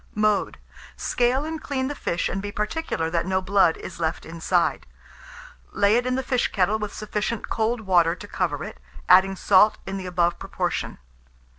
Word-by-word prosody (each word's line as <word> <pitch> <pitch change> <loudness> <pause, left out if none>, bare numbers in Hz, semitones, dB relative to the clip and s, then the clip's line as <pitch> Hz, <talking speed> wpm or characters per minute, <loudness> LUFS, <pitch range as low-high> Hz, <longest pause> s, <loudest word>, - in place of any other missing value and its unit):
Mode. 210 -1 +1 0.4
Scale 250 +4 +1
and 320 0 -5
clean 260 -3 -2
the 290 - -3
fish, 170 -10 -2
and 195 - -3
be 205 0 -5
particular 210 - -2
that 170 +1 0
no 190 0 +1
blood 190 -3 +3
is 170 - -9
left 160 0 -2
inside; 170 +2 0 0.9
lay 200 +2 +3
it 245 +1 +1
in 255 - 0
the 265 - -1
fish 250 -1 +1
kettle 200 +3 +1
with 210 -1 -4
sufficient 215 +1 -3
cold 225 +1 0
water 175 -4 +3
to - - -11
cover - - -2
it, - - -8 0.3
adding 190 +1 +6
salt 205 +3 +4
in 195 0 -4
the 185 -1 -6
above 175 -1 +1
proportion. - - -3
200 Hz, 175 wpm, -24 LUFS, 180-230 Hz, 0.9 s, adding